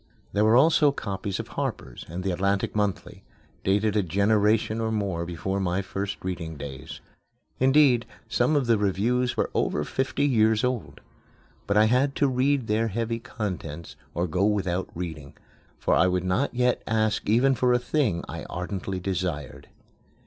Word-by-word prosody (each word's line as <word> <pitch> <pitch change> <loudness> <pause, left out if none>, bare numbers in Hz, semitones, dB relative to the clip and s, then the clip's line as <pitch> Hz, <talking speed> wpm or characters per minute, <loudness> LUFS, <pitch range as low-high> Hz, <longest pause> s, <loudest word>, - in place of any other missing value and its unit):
There 105 - +2
were 110 +2 +5
also 150 +1 +5
copies 100 -6 -4
of - - -6
Harper's - - -5
and 90 +3 -5
The 95 - 0
Atlantic 100 +3 0
Monthly, 105 -3 -2 0.4
dated 105 +2 +1
a 105 - +4
generation 105 +4 +2
or 110 0 -1
more 95 -6 -2
before 90 +3 -3
my 95 0 0
first 100 +1 -4
reading 85 -4 -4
days. 70 -2 -8 0.6
Indeed, 130 -3 +4 0.2
some 120 +5 +1
of 140 -3 +2
the 115 -3 +3
reviews 115 +6 0
were - - 0
over 75 - 0
fifty 130 - -1
years 110 -4 +3
old. 125 -3 -2 0.7
But 100 +1 +2
I 105 - +6
had 130 +5 +2
to 145 - +2
read 130 0 +1
their 110 +1 +1
heavy 115 +2 -2
contents 85 - -6 0.2
or 85 +2 0
go 90 +3 0
without 95 -3 0
reading, 80 -5 -6 0.4
for - - 0
I 90 - +4
would 90 -1 0
not 105 +10 +1
yet 125 0 +1
ask 110 -2 0
even 125 +5 +4
for 125 -1 +2
a 125 - +5
thing 125 - 0
I - - -6
ardently 95 +1 -4
desired. 90 -6 -4
105 Hz, 165 wpm, -26 LUFS, 90-120 Hz, 0.7 s, I